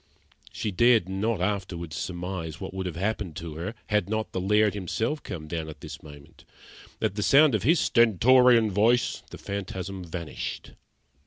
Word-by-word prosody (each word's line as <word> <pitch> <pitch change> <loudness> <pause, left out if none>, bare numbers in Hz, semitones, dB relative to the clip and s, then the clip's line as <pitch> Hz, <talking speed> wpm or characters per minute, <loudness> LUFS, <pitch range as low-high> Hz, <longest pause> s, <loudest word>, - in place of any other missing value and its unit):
She 105 - -3
dared 115 0 +4
not 100 +1 -1
afterwards 90 -5 -3
surmise 90 -1 -5
what 95 - -6
would 95 -1 -3
have 85 - -5
happened 100 -2 -2
to 80 -1 -6
her, 90 +8 -5
had 105 -3 +1
not 110 0 -2
the 95 - -3
Laird 105 +2 +3
himself 110 - -2
come 80 -3 -7
down 80 0 -4
at 75 -1 -11
this - - -8
moment. 75 -2 -14 0.6
At - - 0
the 105 - -3
sound 140 +5 +5
of 110 - +1
his 160 - +3
stentorian 120 0 +5
voice 115 +5 +2
the - - -9
phantasm 95 -1 -5
vanished. 85 -2 -6
95 Hz, 165 wpm, -26 LUFS, 85-110 Hz, 0.6 s, sound